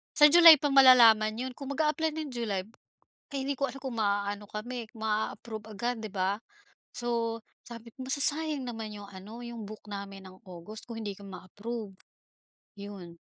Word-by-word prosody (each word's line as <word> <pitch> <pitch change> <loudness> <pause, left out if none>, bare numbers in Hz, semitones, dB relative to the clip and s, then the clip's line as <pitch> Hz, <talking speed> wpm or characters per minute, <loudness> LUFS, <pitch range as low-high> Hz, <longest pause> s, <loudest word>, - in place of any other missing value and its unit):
sa 295 0 +7
July 335 -1 +10
pa 290 - +1
malalaman 235 -5 +7
’yon. 255 +3 -4
Kung 280 0 -5
mag-aapply 310 +1 0
ng 310 -3 -5
July 220 -6 -3 0.7
kaya 275 -1 -3
hindi 280 - -1
ko 275 - +1
alam 270 +1 -8
kung 260 -3 -5
ma-aano 205 0 -1
kami, 235 +3 -6
ma-aapprove 220 0 -4
agad, 240 +3 -2
’di 220 - -6
ba? 190 +1 -1 0.5
So 230 -1 -2 0.2
sabi 230 0 -12
ko, 260 - -8
masasayang 285 0 +3
naman 225 -2 -6
’yong 205 -1 -9
ano, 205 +5 -11
’yong 235 -2 -8
book 215 +1 -11
namin 195 -1 -8
ng 185 +4 -16
August 185 +4 -10
kung 230 -1 -8
hindi 205 -3 -5
kami 200 -1 -12
ma-approve. 205 +2 -7 0.8
’Yon. 200 -4 -10
225 Hz, 165 wpm, -29 LUFS, 205-260 Hz, 0.8 s, July